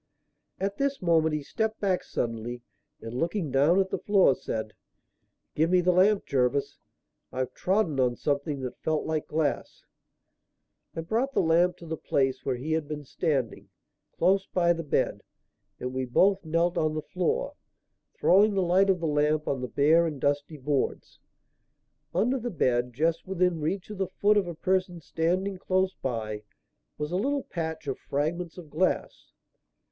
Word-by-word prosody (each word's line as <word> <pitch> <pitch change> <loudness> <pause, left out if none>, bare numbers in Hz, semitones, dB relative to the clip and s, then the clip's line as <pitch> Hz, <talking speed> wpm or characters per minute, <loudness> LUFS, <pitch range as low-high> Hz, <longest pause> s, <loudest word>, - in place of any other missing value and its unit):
At 200 +1 -2
this 280 0 0
moment 160 -3 +2
he 150 - -3
stepped 220 +7 -2
back 190 -3 0
suddenly, 120 +1 -4 0.4
and, 115 +1 -7
looking 165 +3 -1
down 145 +8 +4
at 190 -1 0
the - - -1
floor, 195 -8 +4
said: 110 -3 -5 0.8
"Give 160 +2 +2
me 180 0 +4
the 180 +1 +3
lamp, 195 +3 +3
Jervis, 130 +1 0 0.5
I've 130 0 -3
trodden 185 -7 0
on 125 -2 +2
something 140 0 -2
that 125 -1 -6
felt 155 -1 0
like 155 -1 -2
glass." 155 -1 -2 1.1
I 165 - -2
brought 230 +11 -1
the - - +3
lamp 170 +2 +3
to 170 - -12
the 160 0 -4
place 130 -3 0
where 130 - -1
he 135 +6 -5
had 160 -2 0
been 150 -1 -5
standing, 135 - -2 0.5
close 190 +2 +3
by 175 -1 +2
the 165 - -4
bed, 150 - 0 0.6
and 125 0 -4
we 130 0 -1
both 190 +10 +3
knelt 170 +2 +1
on 155 -1 0
the 155 - -3
floor, 185 - -1 0.6
throwing 205 +3 +4
the 190 - +2
light 185 +3 +3
of 185 -3 +2
the - - -1
lamp 150 0 +1
on 135 -2 -1
the 125 - -3
bare 160 +6 +4
and 150 -4 -5
dusty 145 +3 -1
boards. 140 0 -2 0.9
Under 255 +4 +1
the 240 +1 -3
bed, 125 - +1
just 160 +8 0
within 180 -3 +1
reach 185 +6 -2
of 205 - -8
the 190 - 0
foot 205 +3 +2
of 195 -3 +1
a 170 - -5
person 185 0 0
standing 180 +5 -1
close 185 0 +1
by, 110 - -4 0.6
was 150 +1 -3
a 180 - 0
little 275 +6 0
patch 160 -2 -5
of 135 -2 -3
fragments 160 +5 -2
of 165 -5 -11
glass. 185 +4 -1
165 Hz, 170 wpm, -27 LUFS, 140-185 Hz, 1.1 s, down